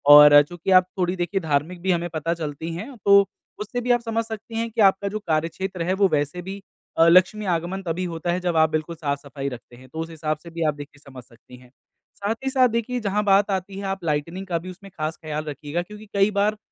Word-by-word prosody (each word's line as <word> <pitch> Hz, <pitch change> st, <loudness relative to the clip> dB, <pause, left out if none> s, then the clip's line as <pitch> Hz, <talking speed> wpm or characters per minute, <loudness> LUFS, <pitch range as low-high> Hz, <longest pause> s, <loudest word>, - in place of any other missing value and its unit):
और 145 Hz, 0 st, +10 dB
चूँकि 175 Hz, +4 st, -5 dB
आप 185 Hz, -, -5 dB
थोड़ी 180 Hz, 0 st, 0 dB
देखिए 185 Hz, +2 st, -2 dB
धार्मिक 160 Hz, +3 st, -1 dB
भी 190 Hz, -, +1 dB
हमें 175 Hz, 0 st, 0 dB
पता 165 Hz, +2 st, -1 dB
चलती 160 Hz, 0 st, -5 dB
हैं, 230 Hz, +10 st, -7 dB
तो 200 Hz, 0 st, +6 dB, 0.3 s
उससे 245 Hz, +4 st, -4 dB
भी 245 Hz, -, 0 dB
आप 240 Hz, -1 st, +3 dB
समझ 230 Hz, -1 st, -1 dB
सकती 225 Hz, +1 st, -8 dB
हैं 230 Hz, 0 st, -1 dB
कि 220 Hz, -, 0 dB
आपका 195 Hz, 0 st, +4 dB
जो 215 Hz, +1 st, -4 dB
कार्यक्षेत्र 170 Hz, +3 st, -2 dB
है 185 Hz, +2 st, 0 dB
वो 195 Hz, 0 st, +3 dB
वैसे 145 Hz, +3 st, -1 dB
भी 195 Hz, +2 st, -7 dB, 0.4 s
अ, 165 Hz, +1 st, +6 dB
लक्ष्मी 185 Hz, +5 st, +4 dB
आगमन 175 Hz, +4 st, -3 dB
तभी 170 Hz, +1 st, -2 dB
होता 165 Hz, +1 st, -2 dB
है 180 Hz, -, 0 dB
जब 180 Hz, -2 st, -1 dB
आप 160 Hz, 0 st, +5 dB
बिल्कुल 155 Hz, +2 st, -3 dB
साफ-सफाई 140 Hz, -2 st, -4 dB
रखते 120 Hz, -1 st, -11 dB
हैं। 130 Hz, +2 st, -15 dB
तो 160 Hz, -, -8 dB
उस 165 Hz, +1 st, -4 dB
हिसाब 155 Hz, -1 st, -3 dB
से 170 Hz, -, -10 dB
भी 165 Hz, 0 st, -7 dB
आप 150 Hz, -, +2 dB
देखिए 145 Hz, 0 st, -11 dB
समझ 130 Hz, -3 st, -12 dB
सकती 125 Hz, 0 st, -17 dB
हैं, 125 Hz, 0 st, -18 dB, 0.5 s
साथ 205 Hz, +3 st, -2 dB
ही 265 Hz, -, 0 dB
साथ 260 Hz, -1 st, +4 dB
देखिए 245 Hz, +2 st, -1 dB
जहाँ 210 Hz, -1 st, 0 dB
बात 200 Hz, 0 st, +4 dB
आती 190 Hz, 0 st, -3 dB
है 200 Hz, -, -6 dB
आप 195 Hz, -1 st, -4 dB
लाइटनिंग 165 Hz, +5 st, -2 dB
का 170 Hz, -2 st, 0 dB
भी 185 Hz, +2 st, -9 dB
उसमें 195 Hz, +2 st, -13 dB
खास 155 Hz, +1 st, -3 dB
ख्याल 155 Hz, -1 st, -4 dB
रखिएगा 150 Hz, +3 st, -4 dB
क्योंकि 210 Hz, +4 st, -11 dB
कई 200 Hz, +1 st, +3 dB
बार 205 Hz, +1 st, +1 dB
175 Hz, 240 wpm, -23 LUFS, 155-200 Hz, 0.5 s, और